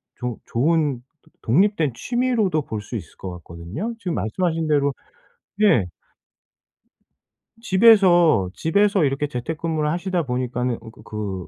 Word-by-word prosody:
조 125 Hz, -2 st, -4 dB
좋은 150 Hz, +2 st, +1 dB, 0.2 s
도 -, -, -26 dB
독립된 160 Hz, -, +2 dB
취미로도 230 Hz, -, 0 dB
볼 110 Hz, -5 st, -5 dB
수 105 Hz, +4 st, -8 dB
있을 110 Hz, -, -7 dB
것 95 Hz, -, -6 dB
같거든요. 85 Hz, -, -6 dB
지금 180 Hz, -7 st, -3 dB
말씀하신 165 Hz, -, -1 dB
대로 140 Hz, -2 st, +2 dB, 0.7 s
예. 165 Hz, -, +4 dB, 1.8 s
집에서 185 Hz, -, +5 dB
집에서 200 Hz, -, +2 dB
이렇게 140 Hz, +2 st, -1 dB
재택근무를 155 Hz, +4 st, -2 dB
하시다 180 Hz, +1 st, -1 dB
보니까는 125 Hz, -1 st, -2 dB
그 115 Hz, 0 st, -12 dB
그 100 Hz, -4 st, -5 dB
150 Hz, 270 characters per minute, -22 LUFS, 120-185 Hz, 1.8 s, 집에서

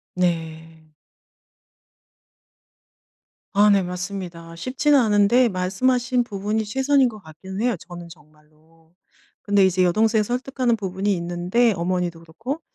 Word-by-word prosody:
네. 160 Hz, -2 st, -3 dB, 2.7 s
아 205 Hz, +1 st, +5 dB
네, 200 Hz, -1 st, +4 dB
맞습니다. 180 Hz, -2 st, -6 dB
쉽지는 270 Hz, -, +2 dB
않은데 220 Hz, +2 st, +3 dB
말씀하신 245 Hz, +7 st, 0 dB
부분이 210 Hz, 0 st, -2 dB
최선인 265 Hz, +3 st, +2 dB
것 215 Hz, -, -11 dB
같긴 190 Hz, +4 st, -9 dB
해요, 245 Hz, -2 st, +1 dB
저는 175 Hz, -1 st, -9 dB
정말로. 155 Hz, +1 st, -22 dB, 0.5 s
근데 205 Hz, -2 st, +3 dB
이제 185 Hz, 0 st, +2 dB
여동생을 215 Hz, +4 st, +2 dB
설득하는 250 Hz, +1 st, -1 dB
부분이 195 Hz, -1 st, -2 dB
있는데, 175 Hz, +7 st, +1 dB
어머니도 175 Hz, -1 st, -2 dB
그렇고, 225 Hz, -, -6 dB
190 Hz, 275 characters per minute, -22 LUFS, 170-235 Hz, 2.7 s, 아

